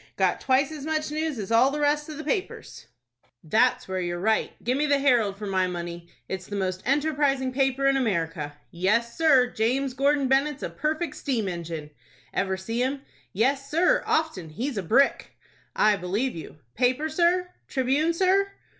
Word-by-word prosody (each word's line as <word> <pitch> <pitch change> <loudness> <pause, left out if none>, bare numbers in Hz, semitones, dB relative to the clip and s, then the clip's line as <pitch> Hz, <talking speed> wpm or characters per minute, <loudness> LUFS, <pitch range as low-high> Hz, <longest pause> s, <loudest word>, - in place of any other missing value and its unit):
Got - - +1
twice 270 +2 +2
as 300 -3 -7
much 310 0 -2
news 310 -2 -2
as 205 -1 -5
all 235 +4 +5
the 295 +2 -3
rest 295 +1 +1
of 305 - -7
the 310 - -6
papers." 370 +6 -4 0.6
"That's 225 +10 +2
where 190 0 -2
you're 175 0 -2
right. 220 +4 +1
Give 245 +3 0
me 295 +2 +1
the 285 -1 +3
'Herald' 240 -8 +2
for 210 - -6
my 190 -2 +1
money. 170 -1 -6 0.2
It's 185 -1 -5
the 205 - -5
most 185 -1 -2
enterprising 275 -2 +1
paper 270 0 +1
in 275 0 +4
America." 165 - -1
"Yes, 220 +7 0
sir. 295 -6 +5
James 255 +4 0
Gordon 280 +1 +2
Bennett's 275 +2 +1
a - - -3
perfect 310 +3 -2
steam 240 -8 -1
engine!" 165 -4 -5 0.4
"Ever 190 -1 -1
see 225 +6 -3
him?" 270 +2 -1 0.3
"Yes, 270 +6 0
sir, 335 +5 +3
often. 310 - 0
He's 245 - -4
a - - -1
brick!" 240 +10 +1 0.4
"I 210 -1 +4
believe 195 +8 -2
you." 160 -1 -9 0.2
"Paper, 255 - +1
sir? 350 +3 +1 0.2
'Tribune,' 280 +5 +1
sir?" 390 +2 +2
260 Hz, 175 wpm, -26 LUFS, 195-295 Hz, 0.6 s, all